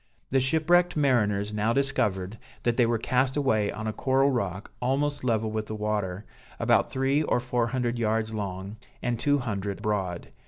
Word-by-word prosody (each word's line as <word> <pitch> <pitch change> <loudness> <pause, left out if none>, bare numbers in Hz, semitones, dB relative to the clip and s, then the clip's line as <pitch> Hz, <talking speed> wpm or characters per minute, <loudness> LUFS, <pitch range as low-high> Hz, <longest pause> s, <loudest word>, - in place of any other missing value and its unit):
The 135 - +4
shipwrecked 165 +6 +3
mariners 105 -7 +2
now 105 +2 +1
discovered 105 -7 0 0.2
that 120 -1 +1
they 120 -2 +3
were 115 0 +1
cast 130 +4 +1
away 110 -8 +2
on 110 - -6
a 110 - -2
coral 135 +3 +2
rock 100 -6 -3
almost 140 +3 0
level 110 -3 0
with 110 0 -3
the 110 - -4
water, 105 -2 -2 0.3
about - - +3
three 135 +2 +1
or 150 - +1
four 120 -1 0
hundred 120 -1 -1
yards 110 0 0
long, 100 0 -5 0.3
and 120 -1 -1
two 145 +1 +3
hundred 100 -6 -3
broad. 95 -5 -2
115 Hz, 170 wpm, -27 LUFS, 105-130 Hz, 0.3 s, The